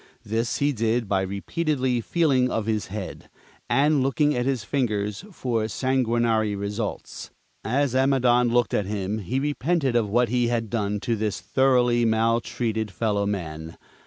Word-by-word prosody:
This 115 +2 -1
he 145 +1 +2
did 115 -2 0
by 95 -1 +1
repeatedly 125 - -1
feeling 135 -3 +2
of 110 -3 -2
his 110 -2 -1
head, 95 0 -7 0.4
and 145 +1 +3
looking 145 +3 +2
at 125 +1 -1
his 130 -6 -1
fingers 105 - -1
for 115 - -1
sanguinary 115 -3 +1
results. 100 +2 -5 0.3
As 130 +4 0
Amidon 130 -2 +3
looked 120 -4 +1
at 100 - 0
him, 105 +1 -2
he 115 +7 -2
repented 145 -1 0
of 115 -3 +2
what 120 +2 +2
he 120 0 +1
had 115 -2 -1
done 105 -3 -1
to 120 -3 0
this 105 -2 -2
thoroughly 120 +3 +2
maltreated 115 0 0
fellow 100 -1 -1
man. 80 -5 -5
115 Hz, 150 wpm, -24 LUFS, 105-130 Hz, 0.4 s, and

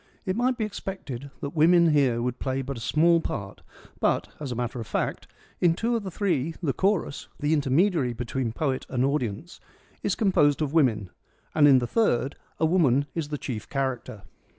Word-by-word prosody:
It 185 - -1
might 250 +2 +1
be 220 - 0
expected 185 - -6
that 140 - -3
women 170 +1 +5
here 130 -5 +2
would 125 0 -2
play 135 0 -2
but 135 +1 -5
a - - -7
small 165 +6 +3
part, 100 -9 -5 0.4
but, - - +1
as 145 -4 -5
a - - -3
matter 120 +1 -3
of 115 - -6
fact, - - -2 0.3
in 170 -2 +3
two 230 +5 0
of 230 - 0
the 195 - -5
three 165 -5 -1
the 140 -5 +1
chorus, 190 -7 0
the 150 +2 +1
intermediary 150 -1 +2
between 120 0 -3
poet 130 +1 -1
and 130 0 +1
audience, 140 - -2 0.4
is - - 0
composed 150 - +3
of 150 -2 -1
women, 115 - +2 0.4
and 145 -2 +5
in 135 -2 +7
the 125 - +1
third 140 - +1 0.2
a 160 - +3
woman 145 -6 +3
is 165 -3 -3
the 150 0 -3
chief 120 -5 -6
character. 130 -7 -3
145 Hz, 190 wpm, -26 LUFS, 125-170 Hz, 0.4 s, in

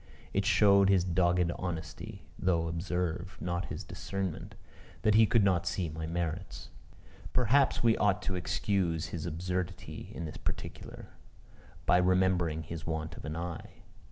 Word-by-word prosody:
It 100 0 +1
showed 100 -2 +6
his 95 -3 +4
dogged 90 -1 +2
honesty, 85 -3 -5 0.2
(though, 85 -3 +1
observe, 90 +1 -2
not 85 +1 -2
his - - -5
discernment,) 95 -4 -4 0.5
that 105 - +4
he 110 0 +7
could 115 -2 +4
not 90 -3 +2
see 85 -1 -1
my 80 +1 -5
merits. 85 +2 -4 0.6
Perhaps 125 +2 +3
we 115 -1 +5
ought 105 0 +2
to 95 - -2
excuse 90 -1 0
his 85 -1 -4
absurdity 90 -1 -4
in 85 - -5
this 75 - -6
particular - - -6 0.8
by - - +5
remembering 90 -3 +2
his 80 0 -6
want 80 -1 -3
of - - -9
an 75 - -4
eye. 85 0 -6
90 Hz, 145 wpm, -31 LUFS, 85-95 Hz, 0.8 s, he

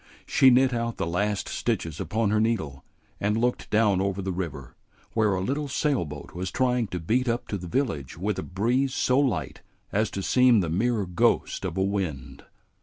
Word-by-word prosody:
She 135 - +5
knit 130 +1 +4
out 115 -1 -2
the - - -1
last 100 +4 -1
stitches 85 -9 -2
upon 110 -1 0
her 110 - +3
needle, 80 -12 -1 0.4
and 105 +2 +1
looked 120 +2 -1
down 105 -3 +3
over 100 0 -1
the 95 0 -2
river, 80 -8 -5 0.4
where 110 -3 +2
a 95 - -1
little 140 +9 -2
sail 135 - 0
boat 75 -1 -9
was 90 +1 -3
trying 125 +2 +1
to 90 - -4
beat 120 +10 0
up 115 +1 -2
to 100 - -2
the 90 - -7
village 80 - -2
with 100 +3 -2
a - - -1
breeze 125 +8 0
so 125 +2 +2
light 95 - -1 0.3
as 110 +2 +1
to 95 - -5
seem 125 -2 +5
the 85 -3 -2
mere 110 +3 +1
ghost 90 -1 +1
of 85 - -4
a 95 - +2
wind. 95 -10 -3
105 Hz, 195 wpm, -26 LUFS, 90-120 Hz, 0.4 s, She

